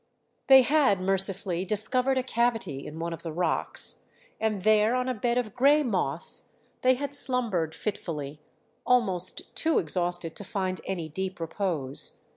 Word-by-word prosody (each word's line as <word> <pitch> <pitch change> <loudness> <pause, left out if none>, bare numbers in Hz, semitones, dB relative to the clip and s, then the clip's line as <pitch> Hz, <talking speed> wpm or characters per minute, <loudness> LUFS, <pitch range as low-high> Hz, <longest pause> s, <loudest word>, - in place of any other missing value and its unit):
They 265 -1 +8
had 265 -7 +2
mercifully 190 -1 -1
discovered 250 +7 +2
a 260 - 0
cavity 230 - -1
in 155 - -9
one 170 +1 -4
of 165 - -8
the 165 - -6
rocks, 170 +1 -2 0.4
and 215 -4 -2
there 215 +2 +3
on 255 0 -1
a 255 - 0
bed 240 +2 -1
of 225 -5 -2
grey 285 +4 +4
moss 180 - -1 0.3
they 255 0 +4
had 285 +2 -5
slumbered 230 - +4
fitfully, 150 -8 -5 0.4
almost 190 -8 0
too 325 -1 +1
exhausted 175 0 -1
to - - -6
find 185 -2 -3
any 175 -4 -4
deep 190 +4 -5
repose. 165 -5 -3
195 Hz, 150 wpm, -27 LUFS, 170-250 Hz, 0.4 s, They